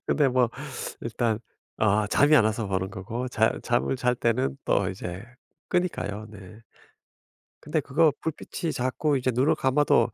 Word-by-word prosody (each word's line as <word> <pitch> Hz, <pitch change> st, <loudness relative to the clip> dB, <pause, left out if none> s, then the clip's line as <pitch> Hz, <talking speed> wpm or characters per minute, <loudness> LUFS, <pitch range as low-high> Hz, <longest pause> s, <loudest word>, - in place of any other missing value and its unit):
근데 145 Hz, -3 st, +3 dB
뭐 125 Hz, -1 st, +3 dB, 0.5 s
일단 115 Hz, -1 st, -1 dB, 0.4 s
아 105 Hz, -1 st, +2 dB
잠이 145 Hz, +7 st, +4 dB
안 115 Hz, -, +5 dB
와서 110 Hz, 0 st, 0 dB
보는 95 Hz, -1 st, -2 dB
거고 115 Hz, +6 st, -5 dB
자 110 Hz, -1 st, +2 dB
잠을 120 Hz, +2 st, 0 dB
잘 125 Hz, 0 st, +1 dB
때는 125 Hz, +3 st, 0 dB
또 95 Hz, -2 st, +2 dB
이제 95 Hz, -1 st, -6 dB, 0.5 s
끄니까요 110 Hz, -, -1 dB
네. 105 Hz, +1 st, -12 dB, 1.0 s
근데 155 Hz, +1 st, 0 dB
그거 150 Hz, +3 st, +3 dB
불빛이 160 Hz, +1 st, -4 dB
자꾸 135 Hz, +4 st, 0 dB
이제 130 Hz, 0 st, 0 dB
눈을 135 Hz, +6 st, +3 dB
감아도 140 Hz, +2 st, +3 dB
120 Hz, 265 characters per minute, -26 LUFS, 105-140 Hz, 1.0 s, 안